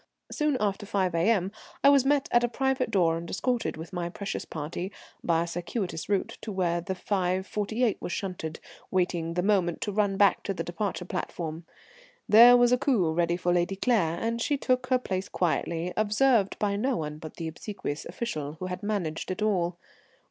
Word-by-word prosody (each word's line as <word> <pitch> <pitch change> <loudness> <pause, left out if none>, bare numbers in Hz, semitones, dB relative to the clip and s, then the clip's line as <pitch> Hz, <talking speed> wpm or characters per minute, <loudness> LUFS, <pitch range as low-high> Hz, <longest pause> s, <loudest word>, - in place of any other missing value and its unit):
Soon 300 -3 +1
after 205 -1 -1
5 190 -3 0
A.M. 190 +2 +2 0.3
I 280 - +8
was 280 -2 +5
met 285 -1 +2
at 240 0 +4
a - - +3
private 265 +1 0
door 170 -6 +2
and 170 0 -7
escorted, 245 -3 -1
with 165 +4 -9
my 175 -1 -2
precious 200 +3 -5
party, 165 +5 -5 0.3
by 165 -1 +2
a - - -5
circuitous 175 +1 -4
route 200 -2 -1
to 220 - -5
where 175 -3 0
the 190 +2 -4
5.48 200 +5 0
was - - -5
shunted, 175 -5 -4 0.3
waiting 175 -3 0
the 180 - +1
moment 185 -4 +2
to 205 - -1
run 200 -1 +1
back 200 -1 +4
to 195 - -3
the - - -3
departure 180 0 -3
platform. 165 -2 -4 0.6
There 240 +3 +9
was 245 0 +4
a 250 - +4
coupé 215 - +2
ready 170 0 +1
for 175 0 +1
Lady 175 +2 +1
Claire, 190 -7 +1
and 230 +1 -1
she 290 +4 +1
took 255 -1 0
her 255 0 +4
place 190 -6 -3
quietly, 170 0 -1
observed 215 0 +2
by 205 -1 0
no 250 +5 0
one 150 -1 -4
but 155 -1 -9
the 165 - -4
obsequious 160 -2 -5
official 155 -7 -4
who 165 +4 -7
had 180 +2 -4
managed 195 -7 -2
it 185 +3 -2
all. 180 -5 +1
190 Hz, 190 wpm, -28 LUFS, 170-225 Hz, 0.6 s, There